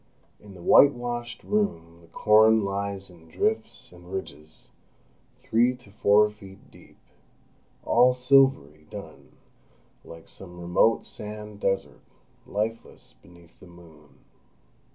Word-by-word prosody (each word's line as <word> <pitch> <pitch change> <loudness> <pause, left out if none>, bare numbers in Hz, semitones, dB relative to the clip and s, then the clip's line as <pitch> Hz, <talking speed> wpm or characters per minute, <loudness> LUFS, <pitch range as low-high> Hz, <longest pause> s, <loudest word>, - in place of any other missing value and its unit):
In 100 -2 -15
the 85 - -13
whitewashed 120 -3 +3
room 85 - -2
the 85 - -20
corn 110 +3 +4
lies 100 -1 -4
in 80 -2 -18
drifts 220 - -2
and 90 0 -15
ridges, 80 -5 -8 0.7
three 120 +3 +2
to 125 -5 -20
four 105 0 +4
feet 100 -2 -16
deep, - - -19 0.9
all 125 0 +4
silvery 125 - +2
dun, - - -11 0.7
like 85 -1 -13
some 90 -2 -11
remote 90 +6 +2
sand 105 0 -9
desert, 95 -1 -2 0.5
lifeless 110 - -5
beneath 85 -1 -20
the 95 - -15
moon. 80 -4 -18
100 Hz, 110 wpm, -25 LUFS, 85-115 Hz, 0.9 s, corn